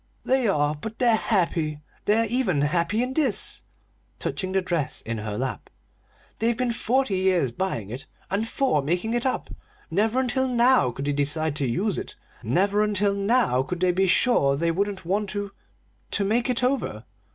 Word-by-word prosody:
"They 260 -2 +2
are 145 -6 +2
but 215 +9 -7
they're 240 -2 +4
happy. 165 -8 0 0.3
They're 220 +2 +3
even 220 - 0
happy 170 +9 +1
in 255 +1 -3
this!" 270 -7 0 0.6
touching 185 -1 -3
the 190 - +2
dress 170 -6 -2
in 115 -1 -4
her 105 -1 -4
lap. 130 0 -4 0.7
"They've 230 +1 +1
been 250 -1 0
forty 240 -2 +1
years 185 -8 +2
buying 115 - -3
it, 130 +3 -7 0.2
and 210 +4 0
four 245 - +1
making 175 +10 -1
it 240 +2 +1
up. 260 - -2 0.4
Never 215 +8 +2
until 260 +1 0
now 245 - +4
could 135 +3 -5
they 145 - 0
decide 145 +2 0
to 140 - 0
use 190 - 0
it; - - -7 0.3
never 195 - +2
until 205 -1 +1
now 200 - +2
could 175 +6 -4
they 185 -1 +4
be 190 +2 +2
sure 185 - +3
they 165 +4 +1
wouldn't 195 +1 -2
want 200 +3 0
to 205 0 -4 0.6
to 205 - 0
make 235 +5 +1
it 250 0 0
over." 265 +2 -1
195 Hz, 175 wpm, -25 LUFS, 155-230 Hz, 0.7 s, they're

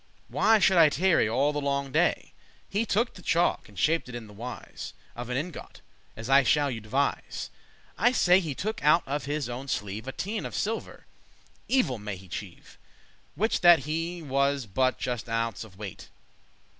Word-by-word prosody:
Why 225 0 +4
should 190 -3 +4
I 160 -2 +8
tarry 170 - +3
all 135 +6 +2
the 145 - -2
longe 140 -1 -1
day? - - +1 0.3
He 215 +3 -1
took 230 +5 +1
the 185 - -12
chalk, 170 -7 +1
and 100 - -17
shap'd 160 -3 +1
it 125 - -7
in 120 -2 -6
the 105 - -14
wise 120 +4 -8 0.2
Of 120 0 -6
an 125 - -1
ingot, 165 +5 -6 0.4
as 115 0 -6
I 135 +1 +6
shall 140 +2 +2
you 115 -3 -5
devise;* 130 +7 -2
*describe - - -27
I 240 +4 +5
say, 185 -7 +5
he 160 -7 -4
took 215 - -4
out 155 +3 +5
of 140 +1 -2
his 145 -2 -2
owen 125 +3 -6
sleeve 105 -1 -3
A - - -2
teine* 205 +9 -3
of - - -8
silver 225 +2 -3 0.6
(evil 245 - +1
may 105 -1 -5
he 95 +1 -13
cheve!) 90 - -4
*little 95 -5 -13
piece - - -17
prosper - - -28
Which 220 +3 0
that 170 -6 +7
ne 165 +3 -3
was 140 -1 +1
but 130 +5 +1
a - - -22
just 120 -1 -3
ounce 115 -2 -1
of 100 -4 -15
weight. 100 -4 -8
140 Hz, 205 wpm, -27 LUFS, 115-170 Hz, 0.6 s, I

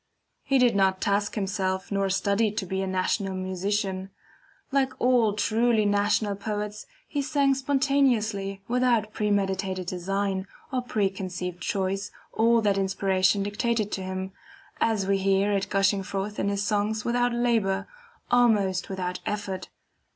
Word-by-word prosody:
He 275 0 +2
did 245 -4 +4
not 190 -1 +3
task 205 +1 0
himself, 190 -2 -2
nor 195 -1 +1
study 200 +3 +2
to 210 -1 -3
be 190 +1 -2
a 190 - -2
national 190 +1 -1
musician. 190 +1 -2 0.6
Like 270 -1 +1
all 245 -4 +3
truly 220 +1 +2
national 205 0 +1
poets 210 0 -4 0.2
he 290 - -2
sang 280 -1 +2
spontaneously 260 -8 +1
without 235 -3 +1
premeditated 195 -3 0
design 190 +2 -2 0.3
or 255 - +1
preconceived 190 -6 -3
choice 195 +1 -1 0.2
all 230 +1 +4
that 200 -2 +2
inspiration 190 0 +2
dictated 215 +1 -1
to 190 - -3
him, 190 0 -4 0.5
as 220 -4 +1
we 195 0 +1
hear 195 +1 +2
it 195 -1 0
gushing 195 0 +2
forth 195 +2 -4
in 200 - +1
his 200 0 -1
songs 210 +1 0
without 245 0 +2
labor, 225 -5 +1 0.4
almost 210 -6 +3
without 180 -1 -3
effort. 205 -3 -3
200 Hz, 135 wpm, -26 LUFS, 190-225 Hz, 0.6 s, did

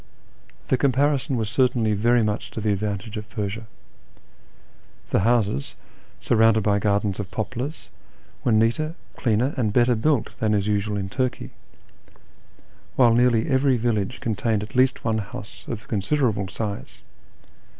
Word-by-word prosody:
The 130 - +3
comparison 140 +1 +1
was 110 -2 -1
certainly 120 -2 +2
very 120 +3 +3
much 105 -1 -2
to - - -6
the 105 -1 0
advantage 105 +2 -3
of 105 0 -7
Persia. 105 +2 -4 1.4
The - - +3
houses, 105 - +1 0.4
surrounded 110 -1 +3
by 100 0 +2
gardens 100 -1 0
of 100 -3 -4
poplars, 120 +8 -4 0.6
were 120 - +2
neater, 115 +9 +2 0.2
cleaner, 120 +4 +1
and 110 -5 +1
better 120 +2 +4
built 120 +2 0
than 110 -1 +2
is 100 -1 0
usual 105 0 0
in 95 -1 -3
Turkey; 125 +3 -2 1.4
while 120 -3 +5
nearly 120 -1 +3
every 130 -1 +3
village 115 -1 -1
contained 110 -1 -1
at 105 - -10
least 130 0 +2
one 110 -1 +1
house 105 0 -8
of 115 0 -6
considerable 105 -1 0
size. 105 0 -5
110 Hz, 140 wpm, -24 LUFS, 105-125 Hz, 1.4 s, while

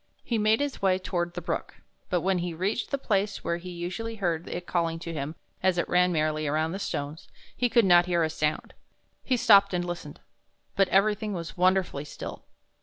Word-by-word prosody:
He 230 -2 -1
made 215 +4 +3
his 285 -1 -3
way 190 -1 +3
toward 175 -2 -3
the 175 - -5
brook, - - -3 0.3
but 180 -1 +1
when 190 +1 +1
he 175 -1 -3
reached 195 +8 -1
the 280 - 0
place 205 -6 -1
where 170 0 -1
he 180 +1 -9
usually 180 +6 -5
heard 175 -5 -1
it 175 0 -5
calling 165 -2 0
to 165 0 -6
him 150 +1 -4 0.3
as 185 -1 +2
it 170 - 0
ran 180 0 +3
merrily 155 -2 0
over 155 +2 +1
the 195 - -4
stones, 145 -4 -4 0.3
he 245 - +1
could 235 -1 +4
not 175 -1 +6
hear 170 -2 +2
a 160 - +1
sound. 150 0 -2 0.5
He 255 - +1
stopped 200 -4 +6
and 175 0 -1
listened, 175 -4 -6 0.6
but 195 -1 +3
everything 210 +2 +2
was 170 -3 -5
wonderfully 185 -5 +1
still. - - -8
180 Hz, 200 wpm, -27 LUFS, 165-200 Hz, 0.6 s, not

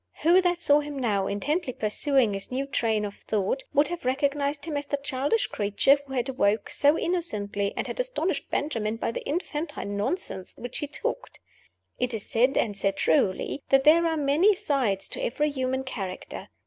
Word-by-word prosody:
Who 345 +4 +6
that 355 -1 +1
saw 295 -3 +4
him 295 -1 -5
now, 205 -7 0
intently 270 - -1
pursuing 235 +1 +1
his 195 +3 -5
new 265 +2 -1
train 225 -6 0
of 200 0 -7
thought, 210 - 0
would 290 +2 +3
have 350 -1 -5
recognized 280 +2 0
him 315 -3 -4
as 285 0 -3
the 285 - -1
childish 280 +9 0
creature 210 +7 +2
who 270 - -8
had 250 -1 0
awoke 215 -5 0
so 290 +2 +4
innocently, 205 - -1
and - - -1
had - - -5
astonished - - -1
Benjamin 225 -7 -1
by 230 - -2
the - - -5
infantine 295 - -3
nonsense 205 - -3
which 245 0 -5
he 295 - -3
talked? 405 - -4 0.6
It 250 -1 0
is 210 - -6
said, 250 +4 +2
and 210 -3 +1
said 195 0 -1
truly, 185 - +1
that 270 0 +5
there 330 +3 +6
are 325 -1 0
many 305 +8 +4
sides 250 - 0
to - - -5
every 295 +5 0
human 260 -1 -1
character. 195 -8 -6
270 Hz, 185 wpm, -26 LUFS, 215-295 Hz, 0.6 s, Who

